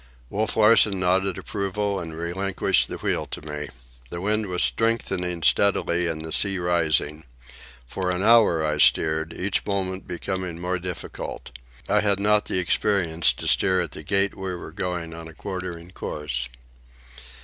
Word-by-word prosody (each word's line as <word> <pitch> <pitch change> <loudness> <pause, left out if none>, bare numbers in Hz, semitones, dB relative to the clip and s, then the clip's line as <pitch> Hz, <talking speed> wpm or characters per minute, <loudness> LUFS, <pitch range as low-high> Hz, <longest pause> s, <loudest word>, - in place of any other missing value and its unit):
Wolf 110 +2 -1
Larsen 105 -2 +5
nodded 95 +1 +1
approval 100 0 -2
and 80 -2 -7
relinquished 95 +3 0
the - - -6
wheel - - -2
to - - -6
me. 75 -1 -5 0.4
The 85 - -5
wind 105 +3 0
was 90 -1 +3
strengthening 95 -7 0
steadily 90 -3 +2
and 80 -1 -4
the 80 - -7
sea 100 +2 +2
rising. 80 -3 0 0.6
For 90 +9 -3
an 90 +1 -1
hour 105 -9 +5
I 75 -1 -1
steered, 80 +1 +3
each 95 +4 -1
moment 95 -2 -3
becoming 90 -1 -4
more 90 +1 -2
difficult. 90 -7 -6 0.4
I - - +3
had 100 -2 +2
not 105 +1 +3
the - - -1
experience 90 -3 +2
to - - -6
steer 95 0 +3
at 85 - -2
the - - -8
gait 100 +4 +1
we 95 -1 -4
were 85 - -8
going 85 -1 -4
on 80 0 -9
a 80 - -13
quartering 90 -2 -6
course. 65 -8 -3
90 Hz, 160 wpm, -24 LUFS, 80-100 Hz, 0.6 s, Larsen